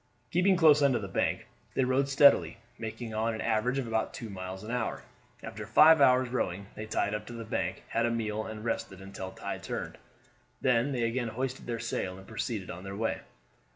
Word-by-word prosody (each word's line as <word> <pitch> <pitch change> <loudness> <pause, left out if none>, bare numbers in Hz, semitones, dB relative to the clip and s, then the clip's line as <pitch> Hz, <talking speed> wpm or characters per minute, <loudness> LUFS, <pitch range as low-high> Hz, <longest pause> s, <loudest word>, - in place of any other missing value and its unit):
Keeping 185 +3 +4
close 155 -3 +6
under 140 -3 +4
the 100 -3 -4
bank, 95 - -1 0.3
they 130 - +3
rowed 130 +2 +1
steadily, 140 -4 +5 0.2
making 110 0 -5
on 110 +1 0
an 110 - -5
average 115 +3 +1
about 115 -4 -1
two 115 -3 -7
miles 95 0 -6
an 110 - -6
hour. 125 -2 -2 0.4
After 110 0 -7
five 155 +7 +7
hours' 130 -1 +5
rowing 100 -6 -2
they 110 - -7
tied 105 -1 0
up 105 0 -4
to 120 - -8
the 115 -1 -6
bank, 110 - -2
had 115 +1 +1
a - - +1
meal, 110 -2 -2
and 110 0 -7
rested 95 -4 -3
until 95 -1 -7
tide - - -6
turned; - - -5 0.6
then 125 +2 +2
they 125 -3 -1
again 120 +1 0
hoisted 130 +4 -4
their 120 -1 -2
sail 95 -5 -3
and 95 - -12
proceeded 105 -2 -4
on 90 - -8
their 95 0 -6
way. 110 +2 -1
115 Hz, 200 wpm, -30 LUFS, 105-130 Hz, 0.6 s, five